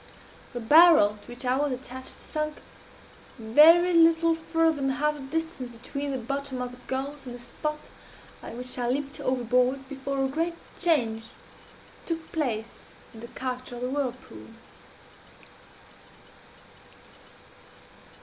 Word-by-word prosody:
The 245 - -4
barrel 240 -5 +6
to - - -19
which 245 +1 -8
I 250 +1 +2
was 290 0 0
attached 260 0 -7
sunk 305 -1 -4 0.7
very 315 +10 +6
little 330 0 +5
farther 325 0 +1
than 270 -1 0
half 295 +3 +1
the 300 - -10
distance 295 -2 -4
between 280 +5 -5
the 270 - -2
bottom 275 +2 -4
of 250 0 -3
the 250 - -13
gulf 275 +2 -4
and 245 - -6
the - - -10
spot 300 +5 -5 0.5
at - - -8
which 250 +1 -5
I 240 -1 0
leaped 280 +3 -2
overboard, 250 +1 +1
before 270 0 -2
a - - +1
great 330 +5 -2 0.2
change 235 -11 +1 0.8
took 330 -1 -4
place 235 -8 -2 0.3
in 225 - -11
the 235 - -8
character 255 0 -5
of 240 - -8
the 250 - -1
whirlpool. 250 - -4
270 Hz, 135 wpm, -27 LUFS, 250-305 Hz, 0.8 s, barrel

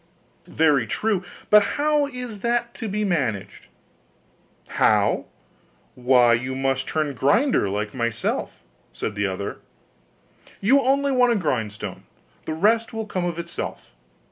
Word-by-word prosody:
'Very 145 -7 +2
true: 205 - -1 0.3
but 210 0 +8 0.2
how 295 0 +2
is 250 -5 -7
that 235 +1 -1
to 225 - -6
be 210 +2 -1
managed?' 110 - -2 1.0
'How? - - +2 0.7
Why, 125 -1 +4
you 125 +3 -1
must 135 0 -1
turn 155 -2 -1
grinder 145 - +2
like 105 +1 -3
myself,' 115 -3 -2 0.3
said 105 - -4
the 100 0 -1
other; 95 +1 -5 1.0
'you 265 +8 +4
only 275 +2 +2
want 250 -2 +4
a - - 0
grindstone; 115 - -3 0.4
the 155 - -3
rest 225 +7 +2
will 225 -1 -3
come 185 -4 -3
of 170 -2 -3
itself. 170 0 -6
170 Hz, 130 wpm, -23 LUFS, -, 1.0 s, but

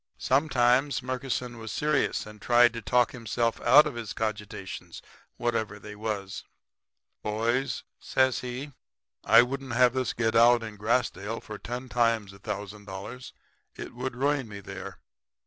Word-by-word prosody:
"Sometimes 135 -1 +2
Murkison 125 -2 -3
was 110 -1 -6
serious 150 +5 0
and 105 -1 -12
tried 120 0 +5
to 115 - -5
talk 125 +3 +2
himself 115 -1 -1
out 140 +6 +7
of 150 - -3
his 115 -3 -5
cogitations, 105 -3 -5 0.4
whatever 110 -3 -1
they 105 0 -10
was. 105 -2 -4 0.8
"'Boys,' 115 +5 -1 0.2
says 130 -1 +2
he, 125 +3 -6 0.5
'I 115 +1 +8
wouldn't 135 0 -4
have 125 0 +5
this 130 -2 -1
to - - -3
get 115 -1 0
out 120 +1 +6
in 110 -1 -7
Grassdale 110 -1 -1
for 105 -1 -9
ten 125 +2 -5
times 115 -5 +1
a 100 - -15
thousand 105 0 -6
dollars. 100 +6 -8 0.4
It - - -8
would 125 0 -4
ruin 140 0 0
me 100 -1 -8
there. 100 - -8
120 Hz, 150 wpm, -28 LUFS, 105-125 Hz, 0.8 s, I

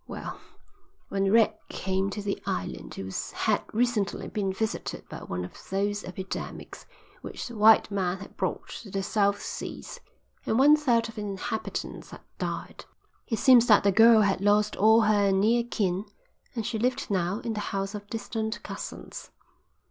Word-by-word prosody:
"Well, - - -7 0.7
when 195 0 +1
Red 225 0 +5 0.2
came 190 +1 -1
to 205 +1 -5
the 200 -1 -3
island 90 0 -4
it 95 0 -6 0.2
had - - +1
recently 225 -3 0
been 200 -2 -2
visited 220 +3 -4
by - - -8
one 90 0 -4
of - - -11 0.2
those 205 +2 -1
epidemics 185 +1 -7 0.3
which - - -6
the 240 - -9
white 220 0 +6
man 190 -2 0
has 195 - -10
brought - - -3
to 215 - -12
the 195 0 -2
South 200 0 +1
Seas, - - -6 0.4
and 220 - 0
one 290 +3 +7
third 245 -7 +2
of 225 - -9
the 215 - -6
inhabitants 210 +2 -4
had - - -11 0.2
died. - - -5 0.4
It 225 - -1
seems 245 -2 +6
that 210 - +6
the 200 - +4
girl 225 +2 +7
had 195 -2 +1
lost 210 +1 +3
all 220 +3 +5
her 205 -2 +3
near 220 +5 +3
kin 200 -4 -1 0.5
and 225 -3 -2
she 220 - -2
lived 250 0 -1
now 185 0 0
in 230 - -3
the 210 - -3
house 195 +1 -2
of 205 -1 -7
distant 220 0 -4
cousins. - - -7
205 Hz, 170 wpm, -27 LUFS, 195-225 Hz, 0.7 s, one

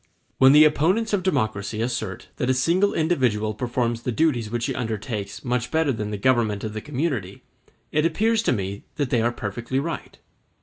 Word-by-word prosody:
When 130 0 +8
the 150 +2 +8
opponents 185 +9 +2
of 200 - +2
democracy 110 - -1
assert 120 +1 -3
that 125 - -1
a 130 - +3
single 175 +10 +2
individual 125 -10 +1
performs 120 0 -1
the 125 - -2
duties 120 -5 +1
which 120 +1 -2
he - - -1
undertakes 110 -3 -4
much 125 -1 -1
better 160 -2 +2
than 105 -4 -3
the 105 - -3
government 110 -3 +1
of 110 -1 -4
the 110 - -4
community, 130 - -3 0.5
it 150 - +2
appears 215 +7 +2
to - - +1
me 100 -3 -3
that 145 -4 -2
they 120 - +3
are 120 +1 +2
perfectly 120 +4 -3
right. 165 +4 -5
125 Hz, 185 wpm, -24 LUFS, 110-155 Hz, 0.5 s, When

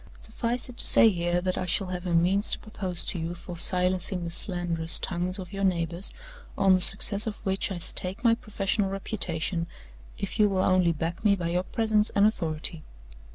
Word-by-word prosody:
Suffice 240 0 0
it 250 -1 -11
to - - +1
say 225 - +6
here 175 -1 -1
that 185 0 -2
I 185 - -3
shall 195 +3 +2
have 180 0 -5
a 170 - +1
means 185 +5 +3
to - - -1
propose 185 -5 -2
to 180 - -1
you 165 +2 -4
for 175 0 -9
silencing 180 +1 -1
the 170 - -5
slanderous 170 -2 -1
tongues 180 +1 -3
of 190 0 -9
your 195 0 -3
neighbors, 170 -1 0 0.5
on 195 -1 +4
the 185 - +3
success 200 +3 +4
of 215 - -3
which 195 +1 -1
I 190 - -3
stake 185 +5 -3
my 230 -2 +5
professional 205 -2 -1
reputation, 180 -4 -2 0.5
if 200 - -5
you 210 -1 +5
will 190 -1 0
only 185 -2 +3
back 165 +3 -4
me 205 -2 +4
by 170 -3 -3
your 175 +1 0
presence 215 +2 0
and 200 0 +5
authority. 165 -6 -1
185 Hz, 200 wpm, -27 LUFS, 175-200 Hz, 0.5 s, say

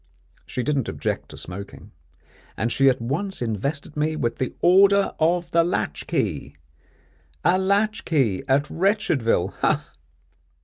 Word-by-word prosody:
She 125 - -3
didn't 135 -2 0
object - - -3
to - - -11
smoking; 100 +3 -9 0.7
and 115 +1 -1
she 135 +2 +4
at 130 - 0
once 155 +12 -3
invested 140 +7 -3
me 155 +1 0
with 120 -7 -2
the 130 - -3
Order 195 +2 +5
of 170 +1 +1
the 170 0 +4
Latchkey 120 - -2 0.9
a 180 +3 +4
latchkey 190 - +1
at 140 +2 +2
Wretchedville, 155 - +1
ha! - - +1
ha! - - -32
150 Hz, 130 wpm, -23 LUFS, 120-180 Hz, 0.9 s, Order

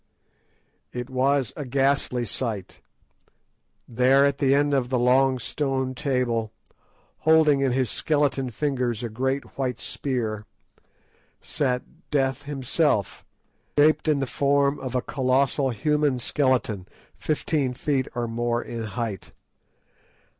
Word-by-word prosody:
It 125 +1 -6
was 130 -2 +1
a 145 - -5
ghastly 135 -2 +1
sight. 110 -3 -3 1.1
There 130 +3 +4
at 140 0 0
the 135 -1 +3
end 145 0 +2
of 130 -3 +1
the 130 - +1
long 130 +2 +3
stone 130 +1 -2
table, 125 -5 -1 0.7
holding 155 -3 +4
in 135 -2 +2
his 130 -2 0
skeleton 145 -4 +1
fingers 125 -2 -2
a 120 - -3
great 130 +5 -3
white 125 -3 -1
spear, 110 -6 -2 0.9
sat 125 -3 -1 0.3
Death 135 -1 0
himself, 140 - 0 0.5
shaped 155 +2 +4
in 155 -2 +3
the 135 - -1
form 140 +1 +1
of 130 -1 -5
a 125 - 0
colossal 135 +1 +1
human 150 +2 +1
skeleton, 125 -7 0 0.3
fifteen 145 -4 -1
feet 135 -1 -1
or 120 -1 -1
more 120 +1 -1
in 115 -1 -6
height. 110 -3 -5
130 Hz, 120 wpm, -25 LUFS, 120-140 Hz, 1.1 s, There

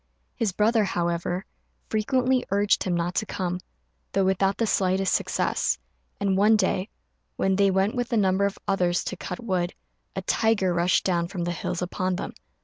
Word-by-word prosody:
His 220 -4 -1
brother, 215 +3 +3
however, 175 0 -1 0.4
frequently 255 +4 +1
urged 200 +1 +2
him 180 -2 0
not 170 +1 -1
to 215 - -1
come, 180 -1 -2 0.5
though 195 - +2
without 190 +1 +2
the 230 - +1
slightest 190 -2 +1
success; - - 0 0.4
and 200 -1 +1
one 210 +3 +5
day, 205 -2 0 0.5
when 190 0 +1
they 200 0 +4
went 195 +2 +2
with 245 -1 -2
a 235 - +2
number 195 -1 +3
of 200 - -6
others 180 -2 +1
to - - -4
cut 180 0 -6
wood, 185 -5 -1 0.4
a - - -3
tiger 210 -5 +2
rushed 175 +1 +2
down 170 -2 +1
from 180 -1 -4
the 175 - -1
hills 175 +1 -3
upon 185 +1 -1
them. - - -5
190 Hz, 175 wpm, -26 LUFS, 180-205 Hz, 0.5 s, one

